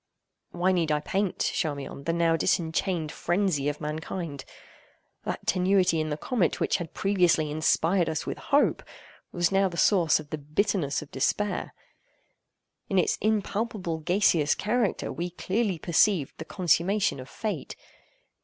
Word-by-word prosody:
Why 180 +2 +1
need 170 -4 +1
I 150 - +2
paint, 190 +5 -1
Charmion, 140 -3 -2
the 165 - +1
now 165 -1 +2
disenchained 165 0 0
frenzy 175 -6 0
of 145 - -5
mankind? 155 -1 -5 0.8
That - - -4
tenuity 185 -3 +2
in 155 - -2
the 150 - -2
comet 195 - 0
which - - +1
had 170 -3 -7
previously 175 -6 +2
inspired 165 +3 +2
us 155 -2 -3
with - - -4
hope, 285 0 +2 0.5
was 175 0 +1
now 195 0 +3
the 170 - -8
source 175 -7 +4
of 150 -2 -11
the 155 - -3
bitterness 155 0 -1
of 150 - -16
despair. 205 +10 -1 1.1
In 195 - 0
its 180 - +2
impalpable 210 -4 -1
gaseous 165 -3 +2
character 220 +1 -1
we 175 +1 -3
clearly 190 +2 -1
perceived 170 -1 +2
the 160 - -5
consummation 185 +2 +1
of 130 +1 -9
Fate. 215 +7 -4
175 Hz, 145 wpm, -27 LUFS, 155-195 Hz, 1.1 s, source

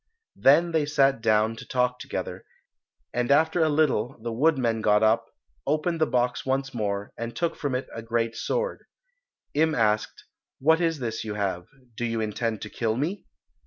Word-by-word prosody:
Then 165 +5 +5
they 155 -3 +1
sat 135 -4 +3
down 110 0 +2
to - - -10
talk 125 0 0
together, - - -5 0.7
and 120 0 0
after 160 +4 +3
a 160 - +4
little 145 -6 +1
the 115 +1 -4
woodman 125 -4 +2
got 105 0 +3
up, 110 +1 +3 0.4
opened 160 +3 0
the 155 - +4
box 125 -1 0
once 135 0 -1
more, 100 -3 -3
and 115 0 -5
took 165 +5 -1
from 140 -3 -2
it 130 - -2
a 115 - -5
great 115 0 -1
sword. - - -2 0.7
Im 155 +1 +2
asked, 110 -2 0 0.3
"What 160 +5 +3
is 165 -2 +1
this 115 -3 -3
you 105 -1 -4
have; 95 -4 -2 0.3
do 120 - -4
you 115 -1 -1
intend 110 0 -2
to 110 - -6
kill 110 -2 -1
me?" 170 +9 -3
125 Hz, 175 wpm, -26 LUFS, 110-150 Hz, 0.7 s, Then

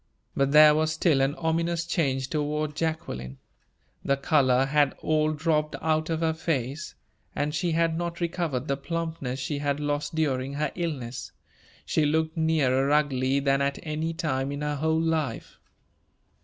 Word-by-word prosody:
But 140 0 +1
there 150 0 +8
was 155 +1 +1
still 155 -3 +2
an 135 +2 +1
ominous 170 +1 -1
change 135 -7 0
toward 150 0 -1
Jacqueline. 155 - -3 0.7
The 140 - +1
color 135 -3 +3
had 145 0 +2
all 155 0 +2
dropped 155 0 0
out 155 0 0
of 165 0 -1
her 160 -1 +2
face, 145 -3 -3 0.4
and 150 +1 -1
she 165 +2 0
had 165 0 +2
not 170 0 -3
recovered 165 -6 -2
the 140 - 0
plumpness 160 -4 -4
she 140 +2 -3
had 145 0 -1
lost 145 +1 -2
during 135 -4 0
her 150 0 -1
illness. 135 -8 -4 0.5
She 155 - +1
looked 160 +2 +1
nearer 140 -5 +2
ugly 140 -2 +2
than 140 0 +1
at 140 0 0
any 155 +1 -2
time 140 -5 -1
in 145 +1 -5
her 150 0 -1
whole 160 +2 +1
life. 160 -7 -2
150 Hz, 155 wpm, -26 LUFS, 140-160 Hz, 0.7 s, there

